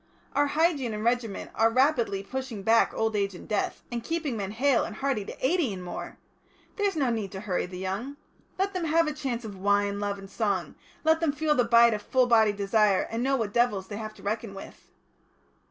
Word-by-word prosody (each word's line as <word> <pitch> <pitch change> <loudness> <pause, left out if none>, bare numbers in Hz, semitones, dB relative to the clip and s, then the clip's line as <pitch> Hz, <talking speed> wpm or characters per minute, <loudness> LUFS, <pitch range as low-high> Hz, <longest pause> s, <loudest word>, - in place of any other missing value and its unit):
Our 290 0 +3
hygiene 290 -7 +1
and 210 - -4
regimen 235 -3 -1
are 225 0 +3
rapidly 235 -6 +2
pushing 260 -3 -5
back 225 +2 +4
old 220 -1 -1
age 200 -2 0
and - - -11
death, 210 - -2
and 235 -1 -3
keeping 315 -3 -2
men 200 -3 -3
hale 250 +4 +2
and 220 - -6
hearty 270 -4 -1
to - - -5
eighty 325 - +2
and 185 -2 -6
more. 175 - -7 0.6
There's 405 -3 +1
no 270 -6 +1
need 215 -4 -3
to 190 - -6
hurry 190 -4 -1
the 180 0 -8
young. 200 +10 -4 0.4
Let 390 +1 0
them 365 -3 -2
have 330 +1 +3
a 305 - -2
chance 260 -6 -4
of 205 -2 -7
wine, 200 +1 +1
love, 205 -1 -2
and 195 0 -10
song; 200 -1 -1 0.3
let 320 0 +4
them 325 -3 +1
feel 305 +1 +1
the 245 -5 +2
bite 235 0 +6
of 210 - -3
full 255 +3 +2
bodied 220 -4 +4
desire, 200 -1 +2
and 230 +1 -2
know 270 +2 +2
what 220 -5 -2
devils 210 -6 +1
they 205 - -5
have 215 -1 -6
to - - -16
reckon 215 0 -3
with." 195 - -11
230 Hz, 220 wpm, -27 LUFS, 205-275 Hz, 0.6 s, bite